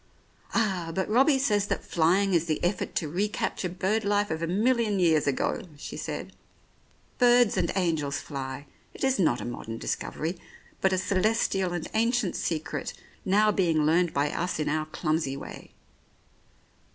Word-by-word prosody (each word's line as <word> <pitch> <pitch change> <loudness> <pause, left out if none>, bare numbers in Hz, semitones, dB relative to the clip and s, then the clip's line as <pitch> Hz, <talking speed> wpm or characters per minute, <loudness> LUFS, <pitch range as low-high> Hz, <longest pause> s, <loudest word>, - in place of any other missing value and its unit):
"Ah, 190 -7 0
but 190 - 0
Robbie 270 +6 +4
says 210 -7 +1
that - - -2
flying 185 +4 +2
is 170 -1 +3
the 155 -2 -2
effort 180 +2 -1
to 160 - 0
recapture 190 +2 -2
bird 190 +5 0
life 205 0 +1
of 160 0 -2
a 165 - -1
million 215 +3 +2
years 160 -5 +3
ago," 140 - 0 0.2
she - - -7
said. - - -5 0.9
"Birds 245 -2 +5
and - - +1
angels 160 -6 0
fly; 135 -1 -6 0.3
it - - -7
is 265 -3 +2
not 140 -9 +3
a - - -5
modern 115 -1 -6
discovery, 165 +8 -3 0.4
but 190 - +3
a 185 - +2
celestial 195 -1 +1
and 175 -2 -3
ancient 230 -3 +1
secret 160 -2 -3 0.3
now 210 +2 +4
being 165 -6 +2
learned 170 +2 +3
by 145 +1 0
us 180 +1 -2
in 150 - -1
our 155 +1 -1
clumsy 155 -3 -1
way. - - -9
180 Hz, 160 wpm, -27 LUFS, 155-210 Hz, 0.9 s, Birds